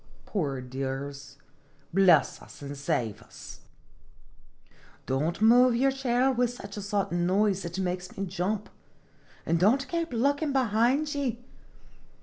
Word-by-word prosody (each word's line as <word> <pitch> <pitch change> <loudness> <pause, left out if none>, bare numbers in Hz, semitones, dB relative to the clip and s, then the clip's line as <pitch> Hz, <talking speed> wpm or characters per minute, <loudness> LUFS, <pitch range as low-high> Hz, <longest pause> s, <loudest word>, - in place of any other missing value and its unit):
Poor 140 -10 -2
dears! 135 +2 -6 0.6
Bless 190 -1 +4
us - - -13
and 140 0 -6
save 120 -6 -2
us! - - -12 1.5
don't 150 +7 -1
move 245 +2 +6
your 270 +3 +3
chair 265 -1 +1
with 245 -1 +1
such 205 -4 -9
a 205 - -5
sudden 195 -4 -1
noise, 195 0 +1
it 170 +1 -5
makes 180 -1 -3
me 195 - -2
jump; 195 +3 -2 0.8
an' 170 - +1
don't 240 +11 +3
kape 335 -1 -2
lookin' 285 +5 +1
behind 260 +4 +2
ye 250 -4 -3
200 Hz, 130 wpm, -28 LUFS, 170-250 Hz, 1.5 s, move